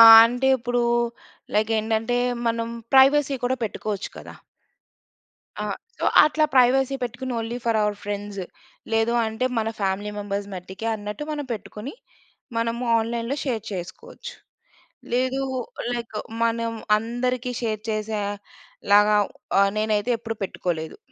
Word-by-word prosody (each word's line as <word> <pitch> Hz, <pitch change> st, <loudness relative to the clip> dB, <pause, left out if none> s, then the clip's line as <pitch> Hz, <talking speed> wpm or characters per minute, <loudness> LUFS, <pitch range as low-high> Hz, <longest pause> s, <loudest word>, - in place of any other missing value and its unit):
ఆహ్, 225 Hz, 0 st, +12 dB
అంటే 245 Hz, +3 st, 0 dB
ఇప్పుడూ 245 Hz, 0 st, 0 dB, 0.7 s
లైక్ 215 Hz, +1 st, +2 dB
ఏంటంటే 225 Hz, +2 st, 0 dB, 0.3 s
మనం 230 Hz, 0 st, -1 dB, 0.3 s
ప్రైవసీ 275 Hz, +1 st, +6 dB
కూడా 260 Hz, +1 st, +1 dB
పెట్టుకోవచ్చు 210 Hz, -1 st, -4 dB
కదా! -, -, -10 dB, 1.3 s
ఆ! -, -, -2 dB, 0.3 s
సో, -, -, -2 dB, 0.2 s
అట్లా 310 Hz, +1 st, +2 dB
ప్రైవసీ 265 Hz, +2 st, +4 dB
పెట్టుకుని, 245 Hz, +2 st, -3 dB
ఓన్లీ 230 Hz, +1 st, -3 dB
ఫర్ 230 Hz, -2 st, +2 dB
అవర్ 210 Hz, 0 st, 0 dB
ఫ్రెండ్స్. 205 Hz, -1 st, -4 dB, 0.5 s
లేదు 225 Hz, +1 st, +2 dB
అంటే 220 Hz, +3 st, -2 dB
మన 225 Hz, 0 st, 0 dB
ఫ్యామిలీ 195 Hz, +1 st, -1 dB
మెంబర్స్ 200 Hz, 0 st, -3 dB
మట్టికే 190 Hz, +4 st, -7 dB
అన్నట్టు 210 Hz, +6 st, -5 dB
మనం 290 Hz, -2 st, -4 dB
పెట్టుకుని, 215 Hz, +3 st, -7 dB, 0.6 s
మనము 230 Hz, +1 st, -1 dB, 0.2 s
ఆన్‌లైన్‌లో 235 Hz, +4 st, -2 dB
షేర్ 230 Hz, -5 st, -1 dB
చేసుకోవచ్చు. 180 Hz, 0 st, -7 dB, 0.8 s
లేదు 260 Hz, +2 st, +1 dB, 0.5 s
లైక్ 235 Hz, -2 st, -4 dB, 0.3 s
మనం 230 Hz, 0 st, 0 dB, 0.2 s
అందరికి 245 Hz, +3 st, -2 dB
షేర్ 215 Hz, -3 st, -2 dB
చేసేలాగా 210 Hz, 0 st, +1 dB, 0.4 s
ఆహ్, 200 Hz, 0 st, +4 dB
నేనైతే 215 Hz, +2 st, +1 dB
ఎప్పుడూ 225 Hz, -1 st, -5 dB
పెట్టుకోలేదు. 160 Hz, -4 st, -4 dB
225 Hz, 120 wpm, -24 LUFS, 210-245 Hz, 1.3 s, ఆహ్